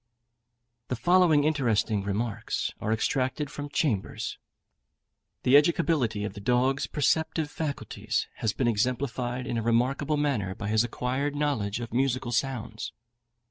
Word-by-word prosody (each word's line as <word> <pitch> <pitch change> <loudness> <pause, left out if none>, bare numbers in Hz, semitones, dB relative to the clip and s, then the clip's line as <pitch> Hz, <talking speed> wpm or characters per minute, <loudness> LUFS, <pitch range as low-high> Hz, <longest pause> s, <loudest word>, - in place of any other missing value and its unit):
The 125 - -1
following 165 +3 +4
interesting 115 -8 +1
remarks 100 +2 -2
are 110 - -1
extracted 130 +6 0
from 145 0 -6
Chambers: 145 - -1 1.0
The 130 - +5
educability 145 -8 +3
of 105 - -4
the 105 - -8
dog's 125 +5 +2
perceptive 160 +1 0
faculties 150 -3 -3
has 110 - 0
been 125 +4 0
exemplified 125 +2 -1
in 115 - -1
a - - -1
remarkable 130 +6 +1
manner 120 -11 0
by 105 0 -4
his 110 +1 +3
acquired 130 +4 -2
knowledge 120 -9 0
of 120 -2 -6
musical 130 -1 0
sounds. 120 -3 -2
125 Hz, 130 wpm, -28 LUFS, 110-145 Hz, 1.0 s, The